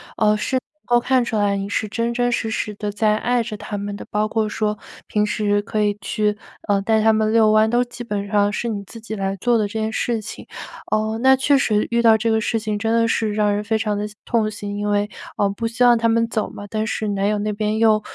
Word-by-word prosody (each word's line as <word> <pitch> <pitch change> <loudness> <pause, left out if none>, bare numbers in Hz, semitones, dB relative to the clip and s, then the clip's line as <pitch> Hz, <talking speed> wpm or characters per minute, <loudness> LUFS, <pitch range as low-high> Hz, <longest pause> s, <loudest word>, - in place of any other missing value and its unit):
呃， 210 -1 +3
是 260 - -2
能 255 - +1 0.2
够 240 - +3
看 250 +1 +2
出 230 - -3
来 205 -1 +1
你 195 0 -3
是 205 +2 -1
真 230 +3 -1
真 245 0 +1
实 225 -2 -1
实 215 -1 -2
地 210 0 -4
在 215 0 +2
爱 240 +1 +1
着 210 - -6
它 205 - -5
们 205 0 -4
的， - - -9
包 210 0 0
括 220 -1 0
说 210 0 -2 0.3
平 210 0 +1
时 205 -1 0
可 210 +1 -2
以 205 0 0
去， 210 0 -1 0.3
呃， 200 -1 +3
带 220 +2 +2
它 220 +1 +5
们 215 0 +1
遛 220 -1 +5
弯， 215 0 +4
都 240 +2 +3
基 240 0 -10
本 205 -2 -3
上 205 -1 +3
是 235 - -2
你 205 -3 -3
自 230 +4 -11
己 220 0 -6
来 195 -1 -2
做 240 +4 +2
的 215 -2 +1
这 200 - -12
件 220 - -1
事 230 0 -1
情。 215 - -9 0.5
呃， 215 +1 0
那 265 +1 +6
确 275 +2 +3
实， 215 -6 +1
遇 235 0 +2
到 225 -1 +6
这 225 +1 0
个 220 - +2
事 225 +1 0
情 215 -1 -2
真 225 +2 0
的 230 0 +3
是 220 -2 0
让 210 -1 +2
人 205 - -1
非 215 +1 0
常 215 -1 -1
的 205 - -2 0.2
痛 225 -3 +1
心， 205 -1 -6
因 205 0 -2
为， 205 0 +1 0.3
呃， 200 -1 +1
不 230 +3 -3
希 235 +2 0
望 240 -1 +6
它 230 0 +1
们 230 0 +3
走 220 -2 -1
嘛， 205 - -9
但 215 +1 -2
是 215 -1 -2
男 200 0 0
友 210 0 +1
那 210 +1 -1
边 210 +1 -1
又 220 -1 +4
215 Hz, 285 characters per minute, -21 LUFS, 210-230 Hz, 0.5 s, 那